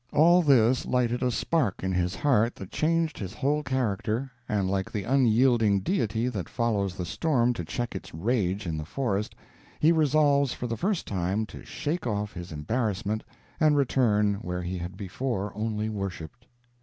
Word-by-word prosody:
All 170 +4 +6
this 130 -5 +4
lighted 125 -1 +1
a 125 - +2
spark 125 - 0
in 95 - 0
his 90 0 0
heart 120 -6 +2
that 95 - -9
changed 165 0 0
his 100 +2 -6
whole 150 +1 +1
character, 125 -1 -1 0.2
and 100 -3 +1
like 95 0 -1
the 105 - -3
unyielding 120 -4 +3
Deity 115 - 0
that 100 -10 -4
follows 105 -6 0
the 90 - -3
storm 125 - +1
to 100 - -5
check 120 +8 -3
its - - -7
rage 100 +1 -1
in 80 -3 -2
the - - -4
forest, 105 - -2 0.4
he 155 - +5
resolves 145 -3 +3
for - - -5
the 115 -1 -2
first 190 - -1
time 95 +3 -1
to - - -11
shake 155 -1 -3
off 105 -1 -2
his 85 0 -8
embarrassment 105 +6 -2 0.4
and 155 -2 +4
return 105 -7 +2
where 90 -4 -4
he 90 +1 -3
had 85 +2 -6
before 100 +1 -3
only 110 0 -2
worshiped. 100 +1 -6
110 Hz, 170 wpm, -27 LUFS, 100-135 Hz, 0.4 s, All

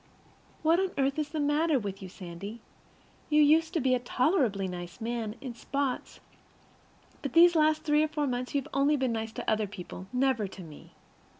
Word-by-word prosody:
What 325 +2 +4
on 380 0 +1
earth 275 +2 +1
is 300 -1 -2
the 310 0 -4
matter 295 +1 +2
with 200 -4 -5
you, 190 - -7
Sandy? 190 +4 -8 0.7
You 300 0 +4
used 320 +2 +4
to - - +3
be 260 -2 +2
a 250 - +2
tolerably 245 - +1
nice 175 +1 -7
man 225 -2 -3
in 255 -3 -6
spots, 270 +2 -3 1.0
but 280 - -4
these 345 +1 +7
last 310 -1 +3
three 300 -1 +3
or 310 - +2
four 300 -1 -2
months 250 0 -3
you 280 - +3
have - - -15
only 285 +2 +3
been 260 -2 0
nice 225 -1 -3
to - - -6
other 215 -1 +1
people, 185 -1 -9
never 250 -4 +1
to 190 0 -10
me. 155 -3 -13
255 Hz, 195 wpm, -29 LUFS, 215-300 Hz, 1.0 s, these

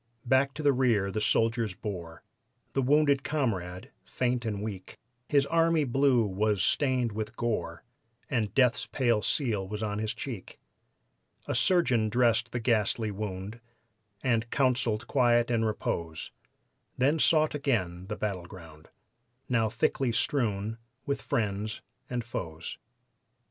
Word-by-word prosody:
Back 130 +2 +2
to 155 - -5
the 145 -1 +5
rear 115 -7 +2
the 110 - -2
soldiers 115 -2 +1
bore 90 -6 -7 0.5
The 135 - +1
wounded 140 +1 +3
comrade, 105 - -2
faint 125 -1 -1
and 105 -2 -2
weak; 100 -4 -7 0.3
His 140 -2 +4
"army 165 0 +3
blue" 130 -2 +3
was 105 +1 0
stained 130 -5 +1
with 110 +2 -5
gore, 120 -2 -2 0.4
And 110 -6 -1
death's 125 -3 +3
pale 120 -5 +1
seal 110 - 0
was 105 +2 -4
on 105 -1 -2
his 110 0 -2
cheek. 115 -9 -7 0.9
A - - -2
surgeon 130 -12 +3
dressed 120 0 +2
the 120 - -2
ghastly 110 -2 +1
wound 100 +1 -5 0.6
And 115 -3 +1
counseled 120 -5 +1
quiet 120 -2 +3
and 115 -1 +2
repose, 85 -6 -3 0.7
Then 145 +5 +2
sought 155 0 +4
again 95 -11 -1
the 105 - -3
battleground, 90 -6 -6 0.6
Now 115 -3 +2
thickly 120 +3 0
strewn 115 -3 -1 0.3
with 140 -2 -2
friends 105 -1 -2 0.3
and 125 -1 -2
foes. 85 -8 -6
115 Hz, 130 wpm, -29 LUFS, 105-130 Hz, 0.9 s, the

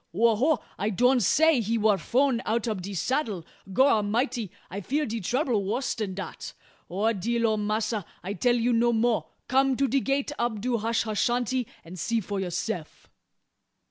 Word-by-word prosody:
"Ho! 225 +2 +4
ho! 280 +8 +2 0.2
I 205 +3 0
doan 250 +5 +3
say 300 - +4
he 225 +2 0
war 215 -1 +4
frown 250 - +1
out 230 +1 -1
ob 215 -5 -2
de 195 +2 -6
saddle. 215 - -1 0.3
Gorramity! 230 0 +2 0.2
I 200 +3 -4
fear 290 - 0
de 230 -1 -3
trouble 245 - 0
wuss 245 +6 -1
dan 205 -4 -4
dat. 195 - -7 0.4
O! 210 +6 +1
dear 230 +4 0
ole 220 -1 +2
Massa, 215 0 -1 0.2
I 195 +3 -3
tell 240 +5 +2
you 240 +1 +1
no 235 +1 +3
mo'. 225 0 +1 0.2
Come 265 0 +3
to 275 - +2
de 275 +3 +2
gate 275 +2 -1
ob 235 -3 0
do 240 +2 0
hashashanty, 230 +2 0 0.2
and 175 +2 -9
see 230 +8 0
fo 205 -1 -4
youseff." 180 -2 -4
230 Hz, 175 wpm, -27 LUFS, 205-250 Hz, 0.4 s, Ho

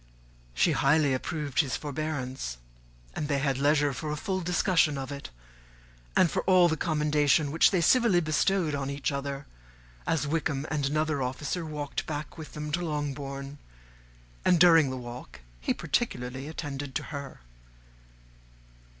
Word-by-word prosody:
She - - +3
highly 145 0 +3
approved 140 +1 -2
his 140 -7 +2
forbearance; 135 - -4 0.6
and 150 - -3
they 145 -1 +1
had 135 -1 0
leisure 145 0 +3
for 155 +4 -5
a 150 - -1
full 185 +4 -2
discussion 170 -3 +2
of 135 0 -5
it, 140 0 -7 0.9
and 170 - +5
for - - 0
all 185 -2 +6
the 160 - +1
commendations 150 -2 +2
which 160 - +5
they 185 -3 +1
civilly 230 0 +4
bestowed 160 +1 +1
on 140 -1 -2
each 140 +1 -2
other, 140 0 -4 0.6
as 150 -3 +1
Wickham 145 -2 -1
and 145 -3 0
another 155 0 0
officer 145 +7 -2
walked 150 -2 -4
back 150 -1 -5
with 160 -2 -9
them 150 0 -5
to 175 +3 -1
Longbourn, 140 -2 -4 0.8
and 180 -2 +4
during 165 -4 +7
the 130 - -4
walk 120 - -9 0.2
he - - -1
particularly 125 +3 -2
attended 145 -4 -5
to - - -1
her. 140 - -7
145 Hz, 150 wpm, -28 LUFS, 140-160 Hz, 0.9 s, during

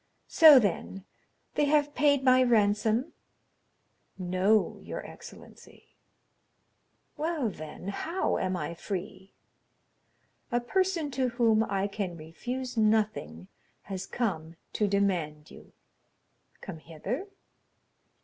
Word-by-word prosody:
So, 310 -4 +8
then, 195 -3 -1 0.5
they 295 - +2
have 295 0 +2
paid 285 -2 +3
my 255 -1 +5
ransom?" 220 +3 +2 1.0
"No, 185 +4 +1
your - - -7
excellency." - - -14 1.3
"Well, 310 -6 -1
then, 155 +1 -8
how 330 - -2
am 185 0 -1
I 170 - -4
free?" 190 +2 -7 1.2
"A 240 - +2
person 340 +3 -1
to 255 -1 0
whom 230 -2 +2
I 195 -2 -1
can 195 -4 -4
refuse 245 +12 -6
nothing 215 - 0 0.4
has 190 -1 -6
come 170 -9 -3 0.2
to 210 - +1
demand 175 -7 -1
you." - - -15 0.9
"Come 170 -5 -8
hither?" 170 - -5
215 Hz, 100 wpm, -28 LUFS, 185-255 Hz, 1.3 s, So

